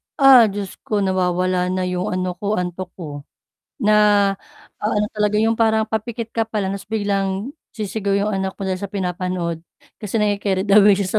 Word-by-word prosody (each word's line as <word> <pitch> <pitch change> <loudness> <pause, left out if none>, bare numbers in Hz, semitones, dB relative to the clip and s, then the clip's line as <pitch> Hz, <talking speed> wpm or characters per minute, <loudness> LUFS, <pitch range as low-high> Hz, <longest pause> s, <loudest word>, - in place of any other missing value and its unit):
Ah 270 -4 +7
Diyos 200 -2 -5
ko! 210 -2 0
nawawala 185 -1 +1
na 185 0 -1
'yong 180 +1 -2
ano 185 -1 -3
ko, 210 -1 -1
antok 180 -1 -3
ko, 170 -4 -8 0.7
na 215 0 +2 0.9
a-ano 210 0 +1
talaga 210 0 +1
'yong 225 +1 +3
parang 220 -1 +2
papikit 225 +1 -4
ka 230 - 0
pala 210 -4 -2
ta's 200 0 -8
biglang 200 +2 -1 0.2
sisigaw 200 -2 -2
'yong 205 +1 0
anak 190 0 -3
ko 195 - -4
dahil 185 -1 -2
sa 200 - -4
pinapanood 180 -3 -3 0.4
kasi 210 +1 -2
na 210 -1 +2
c 200 - -7
caried 195 0 -1
away 205 -1 +7
siya 200 - -1
200 Hz, 175 wpm, -20 LUFS, 185-215 Hz, 0.9 s, Ah